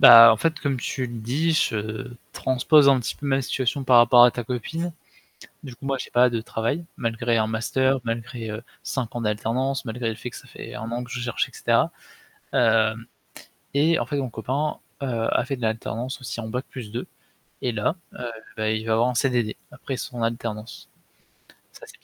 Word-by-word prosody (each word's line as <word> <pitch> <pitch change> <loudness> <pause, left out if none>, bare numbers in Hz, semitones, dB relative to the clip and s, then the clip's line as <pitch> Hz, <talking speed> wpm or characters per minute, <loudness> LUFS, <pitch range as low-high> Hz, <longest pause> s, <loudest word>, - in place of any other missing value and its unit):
Bah, 115 -1 +11
en - - +1
fait, 160 +8 0
comme 140 -3 -1
tu 130 0 -2
le 120 -1 -7
dis, 145 +9 +1
je 115 -2 -1 0.2
transpose 140 +3 +4
un 135 -1 +6
petit 120 - -3
peu 145 - -7
ma 135 -1 +2
situation 130 +1 -1
par 125 -2 +7
rapport 120 +1 +8
à 125 - +7
ta 120 - -4
copine. 160 +9 -3 0.7
Du 130 -4 -8
coup, - - -13
moi 135 -1 +1
j'ai - - -6
pas 125 +1 +5
de 115 -1 -1
travail 115 +9 -2
malgré 115 0 0
un 110 -1 +2
master, 130 +4 +1
malgré, 115 0 -4
heu, 110 +2 -5 0.2
5 125 -4 -3
ans 120 - -2
d'alternance, 115 +5 -1
malgré 120 0 -3
le 110 - -2
fait 125 - -6
que 115 - -10
ça - - -12
fait - - -9
1 110 +1 -5
an 120 +1 -3
que 125 - -13
je 125 - -4
cherche 120 -1 -1
et - - -19
cetera. - - +2 0.6
Hem, 115 -1 +3 0.7
et 155 +4 +3
en - - -1
fait, 145 - -3
mon 130 -3 -2
copain, 135 +7 -2 0.2
heu, 140 - -1 0.3
a - - +2
fait 135 +1 -3
de 125 - -11
l'alternance 115 +3 -2
aussi 120 -2 -5
en 110 - -6
bac 125 +4 -3
plus 120 -5 -8
2, 120 - -4 0.6
et 125 - 0
là, 110 - 0 0.2
heu, - - -11 0.4
beh, 110 0 0
il 110 - -9
va 110 - +2
avoir 115 +2 +3
un 125 - -1
CDD 120 -3 +1
après 135 - -5
son 120 -1 -5
alternance. 115 0 -4 0.9
Ça, - - -12
c'est - - -15
120 Hz, 210 wpm, -24 LUFS, 115-130 Hz, 0.9 s, Bah